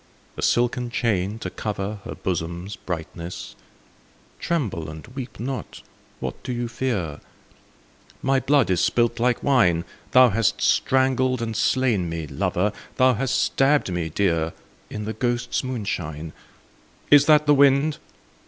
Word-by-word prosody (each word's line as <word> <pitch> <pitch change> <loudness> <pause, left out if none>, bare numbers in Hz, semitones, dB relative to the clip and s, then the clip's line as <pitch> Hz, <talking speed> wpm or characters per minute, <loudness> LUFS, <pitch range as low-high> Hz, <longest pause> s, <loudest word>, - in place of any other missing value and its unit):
A - - -6
silken 120 0 +1
chain, 105 -3 0
to - - -6
cover 105 0 -4
Her - - -6
bosom's 85 +2 -3
brightness? 85 0 -6 0.8
(Tremble 110 - -2
and 80 0 -9
weep 130 -1 -8
not: 130 +3 -5 0.4
what - - -5
dost 125 -2 -4
thou 120 - -1
fear 115 - -2 0.4
?) - - -32
— - - -29
My 135 0 +3
blood 135 -4 +2
is 90 -1 +2
spUt 120 -1 +1
like 120 0 +1
wine, 90 -12 +3 0.2
Thou 125 -1 +7
hast 110 0 +1
strangled 130 -1 +2
and 115 -1 -3
slain 115 -8 +1
me, 80 -1 -4
lover. 95 +7 -1 0.2
Thou 130 0 +4
hast 130 +3 -1
stabbed 135 -6 +2
me 85 -2 -2
dear. 85 -2 0 0.4
In 105 0 -5
the 110 - -3
ghosts' 120 +3 -1
moonshine. 85 - -4 0.8
Is 145 0 +7
that 150 -1 +6
the 145 - +5
wind 140 +2 +4
115 Hz, 145 wpm, -23 LUFS, 90-130 Hz, 0.8 s, Thou